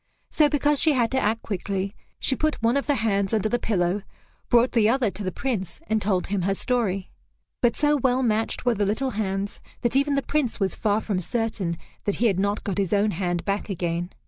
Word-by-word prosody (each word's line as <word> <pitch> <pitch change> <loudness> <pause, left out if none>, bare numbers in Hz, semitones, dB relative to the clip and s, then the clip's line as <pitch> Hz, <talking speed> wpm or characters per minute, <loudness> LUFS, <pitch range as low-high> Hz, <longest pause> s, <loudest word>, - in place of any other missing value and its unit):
So 300 -2 +4
because 290 -1 +2
she 315 -2 +5
had 240 -4 +1
to 265 - +2
act 225 -2 0
quickly, 195 0 -3 0.2
she 265 - +3
put 310 +3 0
one 230 +3 +3
of 280 - 0
the 290 - +3
hands 200 -3 +1
under 215 -1 +1
the 240 - 0
pillow, 190 -3 0 0.5
brought 240 +1 +4
the 220 -3 +3
other 240 -4 +2
to 205 - -7
the 185 - -2
Prince 190 -7 -3
and 220 -5 0
told 190 -3 +1
him 200 -1 -1
her 195 +2 +1
story. 195 -6 -1 0.5
But 240 -1 +2
so 295 0 +3
well 260 -1 +1
matched 225 +1 0
were 245 - +4
the 210 -2 0
little 255 +6 0
hands, 200 -2 -2 0.2
that 240 0 0
even 280 +1 +3
the 275 - 0
Prince 285 -7 -1
was 195 -2 +1
far 210 0 0
from 200 -4 -1
certain 205 -4 -2 0.3
that 205 - 0
he 240 - 0
had 195 -5 +2
not 200 +2 0
got 200 -1 -2
his 195 -2 0
own 205 +1 +3
hand 175 -1 -2
back 200 +2 -2
again. 175 -2 -2
215 Hz, 225 wpm, -25 LUFS, 195-250 Hz, 0.5 s, she